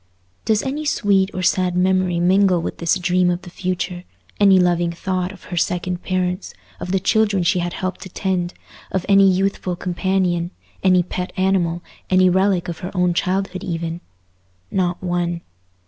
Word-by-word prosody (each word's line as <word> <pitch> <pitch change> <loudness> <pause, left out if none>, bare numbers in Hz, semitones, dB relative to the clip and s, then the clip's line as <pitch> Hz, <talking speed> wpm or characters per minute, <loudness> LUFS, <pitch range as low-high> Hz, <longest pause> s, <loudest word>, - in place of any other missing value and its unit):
Does 215 -1 +2
any 280 +3 -3
sweet 200 -9 +2
or 185 - -4
sad 180 0 +1
memory 185 -1 +2
mingle 185 +1 +4
with - - -5
this 170 +2 +2
dream 180 0 +2
of 175 0 -2
the 175 - -10
future—any 185 +2 0
loving 175 -1 +2
thought 185 +1 -2
of 200 - -14
her - - -3
second 180 +1 -1
parents—of 185 0 -4
the 195 - +2
children 205 -1 +2
she 180 +2 +2
had 175 0 -2
helped 185 -1 -4
to 190 - -8
tend—of 185 0 -4
any 195 -1 +6
youthful 190 -1 0
companion, 180 -1 0 0.3
any 185 -2 +4
pet 180 +1 -4
animal, 180 -3 +1 0.3
any 185 -1 +5
relic 190 -1 +2
of 170 -2 -5
her 180 - -5
own 180 -1 +2
childhood 185 +1 -1
even? 170 -1 -4 0.7
Not 180 -1 -1
one. 175 -1 -1
185 Hz, 155 wpm, -20 LUFS, 175-190 Hz, 0.7 s, any